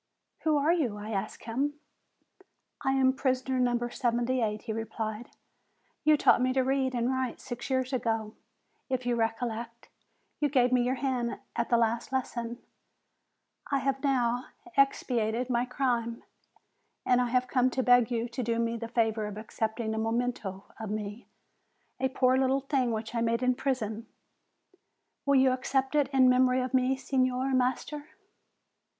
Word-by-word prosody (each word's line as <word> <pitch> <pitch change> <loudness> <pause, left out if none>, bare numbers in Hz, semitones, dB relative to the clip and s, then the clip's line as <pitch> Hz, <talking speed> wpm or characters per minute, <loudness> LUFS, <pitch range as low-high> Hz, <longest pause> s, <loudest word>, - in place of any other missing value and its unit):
'Who 310 -2 +2
are 295 +4 +3
you?' 255 -12 0
I 210 +2 -6
asked 200 0 -4
him. 270 +6 -1 1.1
'I 270 - +2
am 260 -1 +4
prisoner 260 -1 0
No. 240 -1 +1
78,' 240 -3 0
he 220 - -3
replied; 225 0 -4 0.7
'you 305 0 +5
taught 250 - +4
me 255 0 +2
to 260 0 +2
read 265 -1 0
and 240 +1 +1
write 260 -2 -2
six 245 0 -6
years 260 0 0
ago; 225 -3 -1 0.6
if 255 -1 -1
you 245 -1 +1
recollect, 230 0 -3 0.5
you 295 - +2
gave 250 -3 +3
me 250 -1 +4
your 250 +2 +1
hand 255 -3 -1 0.2
at 235 - -1
the 235 - +4
last 230 +2 0
lesson; 240 -2 -2 1.1
I 280 - +2
have 270 +1 -1
now 245 -3 +1 0.3
expiated 250 -3 +1
my 240 0 +2
crime, 240 -3 -1 0.8
and 250 0 +4
I 245 - +1
have 250 +1 +1
come 255 -1 +2
to 260 +1 -1
beg 245 -2 +5
you 235 -1 -1
to 240 +2 -5
do 230 -1 0
me 230 0 0
the 230 0 -5
favor 225 -2 0
of 210 0 -7
accepting 220 +1 -3
a 220 - -2
memento 225 -4 -2 0.2
of 220 -2 -5
me, 210 +2 -5 0.7
a 265 +1 +1
poor 255 0 +3
little 265 +1 +2
thing 265 -2 0
which 220 0 -4
I 230 - 0
made 230 +1 +1
in 255 0 +3
prison. 230 -4 -2 1.2
Will 280 - +4
you 260 -1 +5
accept 265 +1 0
it 295 -3 +3
in 265 -2 +5
memory 255 0 +4
of 255 +1 -3
me, 260 +1 +2
Signor 260 0 0
Master?' 260 +4 -1
245 Hz, 160 wpm, -29 LUFS, 230-260 Hz, 1.2 s, you